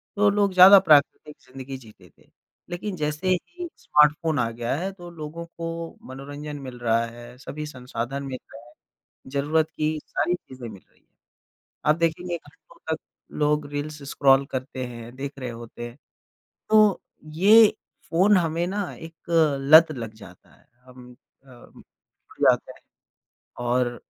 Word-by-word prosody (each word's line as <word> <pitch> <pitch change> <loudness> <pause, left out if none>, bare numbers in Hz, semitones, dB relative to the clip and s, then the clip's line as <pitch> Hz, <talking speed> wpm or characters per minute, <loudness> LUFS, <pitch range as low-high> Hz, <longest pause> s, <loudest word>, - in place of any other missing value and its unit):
तो 205 0 +4
लोग 200 -1 +1
ज़्यादा 190 +2 +10
प्राकृतिक 150 -2 +3
ज़िंदगी 135 +1 -8
जीते 105 -8 -17
थे। - - -26 0.4
लेकिन 185 +2 -4
जैसे 150 +3 -3
ही 350 - -2
स्मार्टफोन 150 0 +2
आ 115 - +1
गया 120 +2 -3
है। 185 +6 -3
तो 175 -3 -11
लोगों 165 +1 -7
को 165 0 -6
मनोरंजन 145 +2 -7
मिल 130 -2 -9
रहा 115 -1 +1
है। 120 +1 -12
सभी 150 +4 -7
संसाधन 130 0 -5
मिल 130 -2 -5 0.2
रहे 110 - -11
हैं। - - -19 0.6
ज़रूरत 155 +3 +1
की 155 0 -1
सारी 175 - 0
चीज़ें 130 -8 -9
मिल 100 -4 -12
रही - - -32
हैं। - - -41 0.8
आप 150 +1 +4
देखेंगे 170 +1 -1
घंटों 150 0 -21 0.2
तक - - -16 0.4
लोग 150 0 +2
रील्स 150 +1 -5
स्क्रॉल 135 0 +4
करते 130 0 -4
हैं 120 0 -10
देख 135 +1 -5
रहे 125 -2 -4
होते 120 0 -8
हैं। 120 - -17 0.7
तो 215 -2 +5 0.3
ये 210 +5 +7 0.4
फ़ोन 190 +5 +4
हमें 170 -1 0
ना 195 0 -3
एक 165 0 -11 0.5
लत 155 +4 +7
लग 115 -6 -6
जाता 95 -5 -16
है। - - -27 0.2
हम 125 -1 -14 0.3
अम, 125 -2 -16 0.6
जाते - - +3
हैं, - - -18 0.8
और 120 0 0
150 Hz, 150 wpm, -24 LUFS, 125-170 Hz, 0.8 s, ज़्यादा